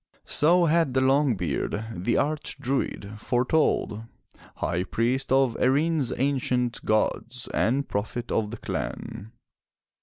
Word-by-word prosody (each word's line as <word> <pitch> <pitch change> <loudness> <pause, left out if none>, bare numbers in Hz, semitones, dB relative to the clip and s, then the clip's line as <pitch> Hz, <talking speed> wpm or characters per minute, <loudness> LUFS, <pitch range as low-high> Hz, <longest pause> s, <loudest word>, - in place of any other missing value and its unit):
So 170 +3 +4
had 160 -4 +2
the 130 - +4
long 135 -1 +3
beard, 90 +5 -2
the 95 +7 0
Arch 150 0 -1
Druid, 125 -6 -3
fore 125 +3 0
told, 120 -7 +1 0.5
high 85 +1 -1
priest 125 +7 -1
of 130 -3 +3
Erin's 145 +1 +2
ancient 125 -3 0
gods 115 +3 -1
and 135 +4 +1
prophet 110 +3 -3
of 105 -2 0
the 120 - -6
clan. 115 -2 -5
125 Hz, 125 wpm, -26 LUFS, 110-140 Hz, 0.5 s, So